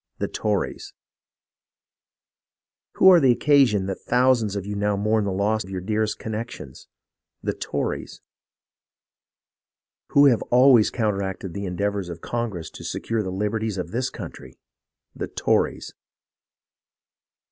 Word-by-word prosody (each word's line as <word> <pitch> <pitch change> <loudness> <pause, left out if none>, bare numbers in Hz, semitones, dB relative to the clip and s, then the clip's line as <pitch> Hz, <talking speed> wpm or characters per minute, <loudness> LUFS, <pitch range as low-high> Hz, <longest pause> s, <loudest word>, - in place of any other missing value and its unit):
The - - -2
Tories! - - -3 2.0
Who 190 - +6
are 180 - +7
the 135 -5 +5
occasion 120 -7 +3
that 95 -1 -5
thousands 125 -4 +2
of 100 -2 -4
you 105 0 -4
now 105 0 0
mourn 105 +1 +1
the 100 - -1
loss 105 +3 0
of - - -12
your 95 -1 -4
dearest 105 +3 -1
connections? 110 - -7 0.6
The - - -1
Tories! - - -4 1.9
Who 140 0 +5
have 125 -5 +4
always 125 -3 +6
counteracted 100 -5 -2
the 100 0 -4
endeavours 100 +1 -2
of 85 -1 -7
Congress 110 -6 -4
to - - -11
secure 115 -1 -2
the 95 - -4
liberties 105 +2 -2
of 90 -2 -4
this 125 +4 -1
country? - - -10 0.6
.The - - -4
Tories - - -1
105 Hz, 125 wpm, -24 LUFS, 95-120 Hz, 2.0 s, are